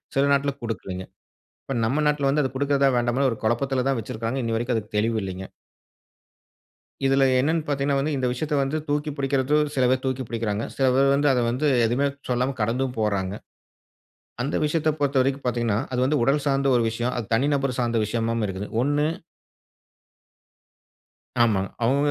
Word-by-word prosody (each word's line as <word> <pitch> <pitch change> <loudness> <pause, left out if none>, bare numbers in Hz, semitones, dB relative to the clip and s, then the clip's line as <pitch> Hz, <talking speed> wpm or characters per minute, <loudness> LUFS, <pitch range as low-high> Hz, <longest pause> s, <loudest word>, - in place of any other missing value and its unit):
சில 135 - +3
நாட்ல 140 0 +1
குடுக்கலைங்க. 95 -5 -5 0.6
இப்ப 135 - -4
நம்ம 140 +7 +1
நாட்ல 145 -2 +1
வந்து 150 +2 +2
அதை 130 - -1
குடுக்கறதா? 140 0 +2
வேண்டாமான்னு 120 +3 +1
ஒரு 115 - -6
குழப்பத்தில 125 +3 0
தான் 135 -3 +1
வச்சுருக்காங்க. 115 +4 -4
இன்னை 115 -1 -1
வரைக்கும் 120 +1 -1
அதுக்கு 105 0 -5
தெளிவில்லைங்க. 100 -4 -2 1.6
இதுல 135 0 +4 0.2
என்னன்னு 155 +4 0
பார்த்தீங்கன்னா 140 -1 0
வந்து, 150 +3 -1
இந்த 130 -1 0
விஷயத்தை 150 +4 -2
வந்து 135 +3 -1
தூக்கி 150 +1 -1
புடிக்கிறதும் 140 +2 +1
சில 130 - +2
பேர் 130 0 +1
தூக்கி 130 0 -1
புடிக்கிறாங்க. 115 -2 -2
சில 135 - +2
பேர் 135 +1 +4
வந்து 145 +1 +2
அதை 125 -2 +1
வந்து 130 +6 -1 0.2
எதுவுமே 125 +5 +1 0.2
சொல்லாம 125 +2 0
கடந்தும் 125 +4 0
போறாங்க. 100 -3 0 1.1
அந்த 135 +4 -2
விஷயத்தை 155 +1 +1
பொறுத்தவரைக்கும் 135 -1 +1
பார்த்தீங்கன்னா, 115 -3 0
அது 125 - -1
வந்து 150 +1 +1
உடல் 140 +3 +2
சார்ந்த 140 0 +1
ஒரு 120 - +3
விஷயம். 120 +2 -2
அது 120 - -3
தனி 130 +5 +1
நபர் 135 -2 -1
சார்ந்த 120 -1 0
விஷயமாவும் 115 0 -1
இருக்குது. 95 +2 -5 0.2
ஒண்ணு 145 +2 +1 2.4
ஆமாங்க. 100 -4 +2 0.2
அவங்க 140 +4 +2
130 Hz, 160 wpm, -24 LUFS, 115-140 Hz, 2.4 s, இதுல